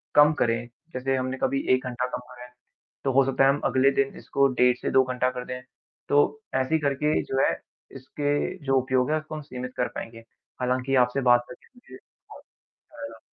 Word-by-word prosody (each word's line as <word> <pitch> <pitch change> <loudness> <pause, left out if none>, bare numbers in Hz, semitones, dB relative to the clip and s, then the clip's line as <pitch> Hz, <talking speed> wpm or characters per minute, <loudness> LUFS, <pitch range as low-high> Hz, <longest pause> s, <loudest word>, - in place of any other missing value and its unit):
कम 150 +1 +7
करें। 115 0 +1 0.3
जैसे 135 +1 -1
हमने 130 0 -2
कभी 135 0 +1
1 130 - +1
घंटा 125 0 -2
कम - - -5
करा 125 0 -11
है, 125 - -16 0.5
तो 135 - +1
हो 135 +1 +5
सकता 135 0 +2
है 135 - +6
हम 140 +1 +2
अगले 135 +1 +3
दिन 135 0 0
इसको 140 0 +1
डेढ़ 125 -1 +3
से - - -3
2 130 - +5
घंटा 125 0 0
कर 125 0 -6
दें। 125 0 -6 0.5
तो 145 - +5 0.4
ऐसे 130 +4 +1
ही 160 - +2
करके 145 +2 +1
जो 135 - -2
है, - - +3 0.4
इसके 145 +2 -2
जो 135 - +2
उपयोग 130 +1 0
है 155 - +2
उसको 155 0 -7
हम 155 - -5
सीमित 125 -3 -7
कर 125 - +1
पाएँगे। 115 0 -7 0.4
हालाँकि 130 +1 0
आपसे 135 +2 -3
बात 120 0 +4
करके 170 - -13
मुझे 245 - -14 0.3
बहुत - - -13 0.3
अच्छा 300 -1 -14
लगा। - - -13
130 Hz, 210 wpm, -26 LUFS, 125-140 Hz, 0.5 s, कम